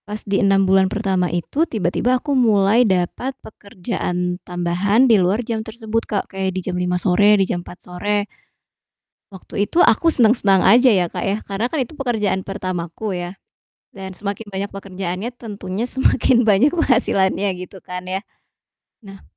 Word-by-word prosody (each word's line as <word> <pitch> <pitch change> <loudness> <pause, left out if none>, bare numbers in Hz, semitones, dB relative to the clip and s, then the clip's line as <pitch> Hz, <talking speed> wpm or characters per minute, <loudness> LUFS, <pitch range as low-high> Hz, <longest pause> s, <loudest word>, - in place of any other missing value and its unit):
Pas 210 +1 -5
di 200 -1 0
6 195 0 +3
bulan 190 0 +3
pertama 185 -3 -1
itu 175 - -2
tiba-tiba 225 +5 0
aku 285 +3 -3
mulai 220 -3 +3
dapat 190 +9 -1
pekerjaan 180 -4 -5
tambahan 180 +6 +1
di 225 -6 +4
luar 200 +7 0
jam 225 -2 -2
tersebut 225 0 -4
Kak, 205 - -1
kayak 190 -1 -2
di - - 0
jam 185 - -3
5:00 180 0 -1
sore, 205 +3 +4
di 195 - +2
jam 175 -2 -3
4:00 175 0 -13
sore. 205 +3 -2 1.1
Waktu 195 +1 -4
itu 330 +11 -1
aku 330 +3 +4
seneng-seneng 220 -7 +4
aja 245 +7 +5
ya, 185 -4 +2
Kak, 180 +1 -5
ya, 200 +2 -1
karena 205 +5 -2
kan 315 - -2
itu 260 +4 -4
pekerjaan 220 -8 -1
pertamaku 185 0 -4
ya, 175 +2 -6 0.5
dan 190 -1 -9
semakin 205 +3 -5
banyak 195 0 -5
pekerjaannya 195 +1 -5
tentunya 205 -2 -5
semakin 255 -1 +2
banyak 215 +9 +4
penghasilannya, 205 - +1
gitu 185 +1 -11
kan 180 0 -7
ya. 190 +2 -3 0.8
Nah 195 0 -12
195 Hz, 160 wpm, -20 LUFS, 185-225 Hz, 1.1 s, aja